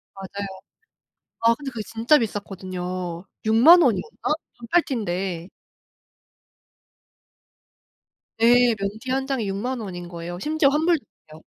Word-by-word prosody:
맞아요. 195 +1 -6 0.9
아 230 0 +4
근데 280 0 -7
그게 225 -3 -5
진짜 230 +7 +3
비쌌거든요. 185 -4 -4 0.2
60,000 270 +11 +7
원이었나? 300 - 0 0.2
반팔 240 +9 +2
티인데. 185 - -3 2.9
예. 240 0 +6
면 200 -1 -2
티 255 - -4
1 265 0 -1
장이 250 -7 -1
60,000 240 +6 -3
원인 175 -4 -7
거예요. 175 0 -7
심지어 305 +4 +2
환불도 315 0 +2 0.3
안돼요. 155 +1 -13
225 Hz, 225 characters per minute, -23 LUFS, 185-265 Hz, 2.9 s, 60,000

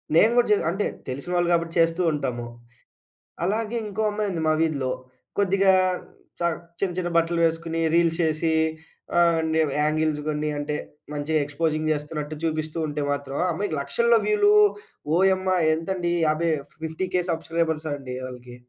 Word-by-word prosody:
నేను 215 +7 +6
గూడా 240 - +4
జే - - +7
అంటే 195 +5 -1 0.2
తెలిసిన 135 +7 -5
వాళ్ళు 175 0 +2
కాబట్టి 165 0 0
చేస్తూ 165 +2 +3
ఉంటాము. 125 -5 -3 1.0
అలాగే 215 +5 -1
ఇంకో 210 +2 -3
అమ్మాయి 210 0 -1
ఉంది 170 -3 -3
మా 155 - +4
వీధిలో. 145 -5 0 0.5
కొద్దిగా 195 -1 +4 0.7
చ - - -11 0.4
చిన్న 190 -3 0
చిన్న 175 -1 -1
బట్టలు 170 0 +2
వేసుకొని 165 0 -1
రీల్స్ 170 -1 +3
చేసి 160 +1 +1 0.7
ఆహ్, 170 -1 +4
న్యూ 160 0 +3 0.2
యాంగిల్స్ 155 0 +1
కొన్ని 150 0 -1
అంటే 145 +1 -2 0.4
మంచిగా 150 +2 0
ఎక్స్పోజింగ్ 155 +1 -1
చేస్తున్నట్టు 150 0 -5
చూపిస్తూ 155 -1 -2
ఉంటే 150 0 -3
మాత్రం 140 -1 -3
ఆ - - +1
అమ్మాయికి 165 -2 -2
లక్షల్లో 230 +12 +3
వ్యూలు. 415 -1 +4 0.6
ఓయమ్మా! 190 0 +3 0.2
ఎంతండి 175 +1 -1
యాభై 160 +2 +1 0.3
50,000 180 +3 -1
సబ్స్క్రైబర్స్ 160 -1 -1
అండి. 130 -3 -7
వోళ్ళకి. 125 -1 -10
165 Hz, 145 wpm, -24 LUFS, 150-185 Hz, 1.0 s, జే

